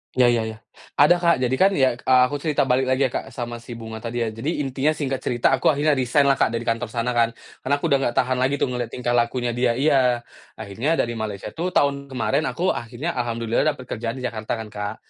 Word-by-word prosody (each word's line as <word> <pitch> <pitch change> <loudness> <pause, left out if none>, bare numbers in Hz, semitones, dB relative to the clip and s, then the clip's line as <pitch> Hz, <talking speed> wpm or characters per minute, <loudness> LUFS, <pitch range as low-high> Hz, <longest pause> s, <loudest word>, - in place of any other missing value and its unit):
Iya 125 -1 +5
iya 120 -1 +1
iya. 110 0 -7 0.4
Ada 150 +5 +6
Kak 170 -1 +4
jadi 125 +1 +1
kan 195 +1 +5
ya, 135 -2 +4
eee, 130 0 +4
aku 145 +3 -3
cerita 150 0 +1
balik 130 +1 +1
lagi 130 +1 +2
ya 130 - +1
Kak - - -4
sama 120 -1 -6
si 120 +1 -9
Bunga 110 -1 -7
tadi 115 +1 -3
ya 110 - -2
jadi 115 +7 -4
intinya 135 +3 0
singkat 135 -3 -2
cerita 120 -2 +1
aku 130 -1 +1
akhirnya 150 +1 +3
resign 130 +1 +2
lah 135 -1 +2
Kak - - +4
dari 115 - -3
kantor 115 +1 -1
sana 115 +2 -2
kan, 115 -1 +1 0.2
karena 140 +2 0
aku 145 - -4
udah 140 - +5
nggak 120 -3 -1
tahan 130 -1 +1
lagi 130 +2 +2
tuh 135 - -1
ngeliat 125 -1 -2
tingkah 120 +1 -3
lakunya 120 0 +1
dia 120 0 +1
iya 130 -3 +2 0.3
akhirnya 120 +11 -2
dari 120 - 0
Malaysia 110 -4 -5
itu 165 - -5
tahun 140 -1 +1
kemarin 140 +3 -1
aku 185 +2 0
akhirnya 120 +8 -4
alhamdulillah 115 +1 0
dapat 130 - -10
kerjaan 115 -1 -4
di 130 - -7
Jakarta 110 -2 -3
kan, 110 -2 -7
Kak. 105 0 -4
125 Hz, 240 wpm, -23 LUFS, 115-140 Hz, 0.4 s, Ada